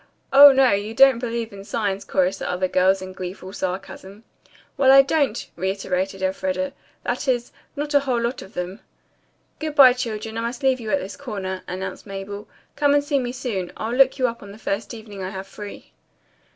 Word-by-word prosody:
"Oh, 285 +1 +11
no, 265 -1 +4
you 205 +3 -1
don't 265 -2 +6
believe 235 -2 -3
in 195 0 -9
signs," 200 -1 -2
chorused 190 0 0
the 185 +1 -1
girls, 185 +1 +2
in 185 0 -8
gleeful 185 +1 -7
sarcasm. 190 +2 -6 0.5
"Well, 265 -1 +5
I 275 0 +9
don't," 275 -5 0
reiterated 190 +1 -2
Elfreda. 185 0 -1 0.3
"That 245 +3 -2
is, 245 -2 0 0.2
not 295 +1 -3
a 285 - +6
whole 260 -4 -1
lot 235 +2 -2
of 190 - -13
them." 180 +3 -4 0.8
"Good 310 -1 -4
bye, 260 -3 +9
children, 225 -2 -4
I - - -2
must 235 +3 -4
leave 260 -1 +3
you 225 -2 -6
at 290 - +3
this 190 - -7
corner," 195 -8 -5
announced 185 +2 -6
Mabel. 200 +1 -7 0.3
"Come 285 -1 +3
and 290 - +3
see 290 -1 +1
me 245 -2 -3
soon. 235 -8 -4
I'll 225 +2 -3
look 265 +1 +4
you 255 -2 +2
up 235 -1 -5
the 200 +1 -11
first 210 -1 -3
evening 210 -3 -10
I 185 - -3
have 190 0 -6
free." 205 +1 -10
215 Hz, 190 wpm, -23 LUFS, 190-255 Hz, 0.8 s, Oh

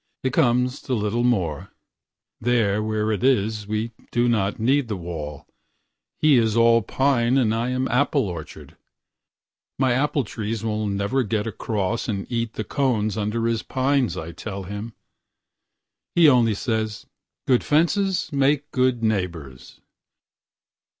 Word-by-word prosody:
It 130 -1 -1
comes 125 +2 +2
to 130 - -2
little 110 +2 -1 1.2
more:There 110 -4 +2
where 110 0 -1
it 105 +1 -2
is 110 -5 +1
we 110 +2 -2 0.2
do 120 0 +2
not 105 -4 +1
need 130 +3 +2
the 105 -3 -3
wall:He 85 - -3
is 110 -2 +1
all 115 0 +5
pine 130 +2 +1
and 115 -5 +2
I 115 +2 -1
am 130 +1 -1
apple 140 -1 +1
orchard.My 90 - -7
apple 140 +2 +1
trees 110 0 -4
will 110 -1 -1
never 100 +6 0
get 110 -2 -1
acrossAnd 105 -1 -2
eat 115 -1 -2
the 110 - -3
cones 110 -4 0
under 110 +2 -1
his 115 -1 0
pines, 130 -7 0
I 80 -1 -5
tell 100 +2 -6
him. 105 +4 -7 1.2
He 170 -2 +7
only 120 -6 +4
says, 110 -1 -2 0.4
"Good 125 -2 +3
fences 180 +4 +1
make 140 +1 +1
good 130 -2 +1
neighbors." 85 - -3
115 Hz, 130 wpm, -23 LUFS, 105-130 Hz, 1.2 s, He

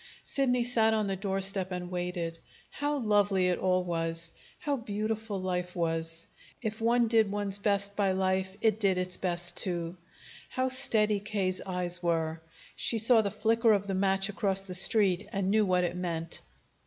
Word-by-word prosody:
Sidney 250 -3 +1
sat 225 -2 +2
on 215 -1 0
the 195 -1 -1
doorstep 195 -1 0
and 180 0 -5
waited. 175 -2 -3 0.3
How 290 0 -2
lovely 205 -6 +2
it 180 - 0
all 185 -1 +1
was! 165 -1 -3 0.3
How 290 -2 -1
beautiful 215 -2 -3
life 180 -1 -3
was! 165 -1 -2 0.3
If 220 -1 -4
one 235 +1 +3
did 220 -3 +3
one's 205 -1 0
best 200 0 0
by 200 -2 +2
life, 190 0 -1
it 220 -1 +2
did 195 -3 +2
its 185 0 0
best 175 -1 0
too. 175 -1 -1 0.5
How 260 0 -1
steady 220 -5 +3
K.'s 195 -3 -2
eyes 180 -1 -2
were! 165 -2 -1 0.3
She 230 - +1
saw 225 +1 +5
the 205 - -1
flicker 225 +2 +2
of 200 -1 0
the 195 - -3
match 195 0 +1
across 195 -2 -1
the 190 -1 -8
street, 190 0 +3
and 195 -1 -1
knew 215 -1 +3
what 180 -1 +2
it 175 - -2
meant. 170 -2 -4
195 Hz, 170 wpm, -29 LUFS, 180-215 Hz, 0.5 s, saw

